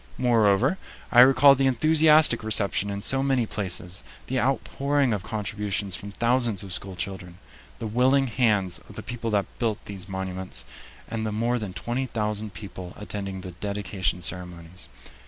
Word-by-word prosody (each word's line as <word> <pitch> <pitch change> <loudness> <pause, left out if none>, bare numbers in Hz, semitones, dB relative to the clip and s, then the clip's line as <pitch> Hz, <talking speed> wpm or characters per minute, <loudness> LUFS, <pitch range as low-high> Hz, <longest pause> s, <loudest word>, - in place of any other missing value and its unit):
Moreover, 120 - +3 0.3
I 120 - +6
recalled 135 +1 +7
the 135 - +3
enthusiastic 155 0 +4
reception 100 -2 +3
in 100 0 -4
so 135 +3 +2
many 135 -3 +1
places, 95 -3 -3 0.2
the 130 0 -1
outpouring 135 0 0
of 105 - -2
contributions 100 -2 -2
from 100 - -7
thousands 120 -2 +1
of 95 -2 -5
school 95 0 -2
children, 90 -2 -6 0.4
the - - -6
willing 130 +5 +3
hands 105 -7 +1
of - - -12
the - - -7
people 115 -1 -4
that 105 -2 +1
built 115 -3 0
these 100 -1 -8
monuments, 95 -1 -5 0.4
and 115 -1 -4
the 110 - -2
more 120 +3 0
than 100 -4 -5
twenty 125 +6 -3
thousand 105 -3 -3
people 95 -2 -8
attending 100 -2 -5
the 90 -1 -7
dedication 95 -2 -3
ceremonies. 90 0 -4
105 Hz, 155 wpm, -25 LUFS, 95-125 Hz, 0.4 s, recalled